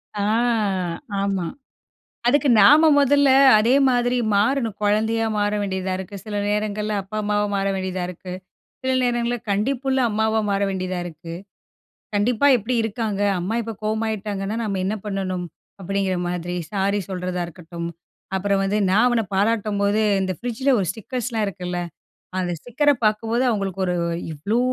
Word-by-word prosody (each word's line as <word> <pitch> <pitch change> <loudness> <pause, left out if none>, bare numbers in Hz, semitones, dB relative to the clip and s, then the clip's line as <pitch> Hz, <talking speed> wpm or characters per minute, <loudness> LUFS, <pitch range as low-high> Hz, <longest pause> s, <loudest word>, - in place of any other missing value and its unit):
ஆ 205 - -2 1.0
ஆமா. 195 -3 -1 0.8
அதுக்கு 285 +2 +3
நாம 300 +10 +7
மொதல்ல 285 0 +4 0.3
அதே 235 +5 +3
மாதிரி 245 0 +1 0.2
மாறணும். 225 +1 +1
குழந்தையா 220 +2 +2
மாற 205 0 +1
வேண்டியதா 190 -1 -2
இருக்கு. 190 +1 -7
சில 210 -1 -5
நேரங்கள்ல 210 0 -1
அப்பா, 205 +3 -7
அம்மாவா 210 0 +1
மாற 195 0 0
வேண்டியதா 185 -1 -3
இருக்கு. 180 +1 -8 0.5
சில 260 - +1
நேரங்களில் 240 -1 -1
கண்டிப்புள்ள 265 +6 0
அம்மாவா 220 +1 +1
மாற 200 0 0
வேண்டியதா 185 -1 -3
இருக்கு. 165 0 -8 0.8
கண்டிப்பா 225 +6 +2
எப்படி 240 +3 -2
இருக்காங்க, 220 -2 -2 0.2
"அம்மா 190 +6 -2
இப்போ 225 0 -5
கோவமாயிட்டாங்கன்னா 215 -2 -2
நம்ம 200 -3 -2
என்ன 205 +3 -1
பண்ணணும்?" 190 -3 -2 0.4
அப்படிங்கிற 195 0 -1
மாதிரி 175 0 -3 0.2
சாரி 200 0 0
சொல்றதா 180 -1 -3
இருக்கட்டும், 170 0 -7 0.5
அப்புறம் 195 +1 +1
வந்து 195 +2 0
நா 200 - +4
அவன 240 -2 +2
பாராட்டும்போது 205 0 +1 0.2
இந்த 190 -1 -1
ஃப்ரிட்ஜில்lல 245 - 0
ஒரு 190 - -1
ஸ்டிக்கர்ஸ் 245 +4 -5
லா 220 - +1
இருக்குல? 180 -1 -4 0.6
அந்த 180 -1 -1
ஸ்டிக்கர 250 - +1 0.2
பாக்கும்போது 225 +3 +1
அவங்களுக்கு 195 -4 -2
ஒரு 180 - 0 0.4
இவ்வளோ 200 +10 -1
205 Hz, 140 wpm, -22 LUFS, 190-225 Hz, 1.0 s, நாம